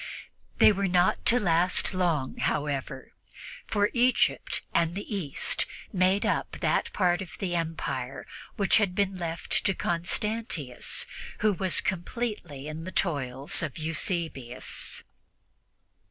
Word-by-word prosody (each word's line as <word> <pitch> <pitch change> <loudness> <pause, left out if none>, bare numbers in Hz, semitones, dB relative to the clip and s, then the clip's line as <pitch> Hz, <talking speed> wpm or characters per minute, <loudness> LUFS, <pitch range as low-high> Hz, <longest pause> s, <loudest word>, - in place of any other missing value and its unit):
They - - +8
were 200 -1 0
not 180 0 +3
to 245 - +5
last 175 -1 +3
long, 170 -8 0
however, 145 -2 -2 0.5
for 205 0 +2
Egypt 245 +1 +2
and 170 0 +2
the 205 +1 -4
East 160 -8 0 0.3
made 185 +2 +3
up - - 0
that - - +1
part 175 -2 +2
of 185 - -8
the 180 -3 -2
Empire 140 -6 -3 0.3
which 200 -2 +4
had 200 -5 +1
been 195 -2 +1
left 170 0 -1
to 195 -2 +1
Constantius, 175 - -1 0.4
who 215 -1 +4
was 185 0 +2
completely 180 - -3
in 155 +1 -5
the 185 - -6
toils 140 -6 0
of 155 -5 -3
Eusebius. 155 -5 -3
175 Hz, 125 wpm, -28 LUFS, 155-195 Hz, 0.5 s, They